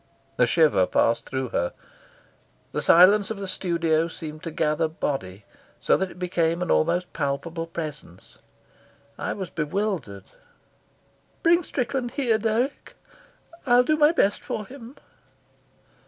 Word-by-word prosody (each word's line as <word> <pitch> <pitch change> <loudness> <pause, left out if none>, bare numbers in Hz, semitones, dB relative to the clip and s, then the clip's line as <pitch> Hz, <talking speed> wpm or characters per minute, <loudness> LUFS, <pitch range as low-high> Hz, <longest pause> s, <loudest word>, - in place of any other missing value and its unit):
A 125 - +5
shiver 150 - +3
passed 115 - +1
through 130 -2 -3
her. 85 -4 -1 1.0
The - - -2
silence 190 +4 +6
of 220 -2 -5
the 195 - -5
studio 170 -3 0
seemed 155 -2 -8
to - - -5
gather 155 0 0
body, 105 - -4 0.3
so - - +3
that 190 0 -1
it 175 - -14
became 175 -1 0
an 180 - -2
almost 175 +3 +1
palpable 165 +3 -3
presence. 150 - -8 0.8
I - - -2
was 190 -4 -6
bewildered. 155 - -3 1.2
"Bring 340 +1 +5
Strickland 255 -4 -2
here, 235 -6 +1
Dirk. 230 +5 -2 0.7
I'll 245 0 +6
do 310 +4 +2
my 300 0 +5
best 205 -11 +1
for 210 - -4
him." 260 +2 -12
170 Hz, 130 wpm, -24 LUFS, 150-215 Hz, 1.2 s, silence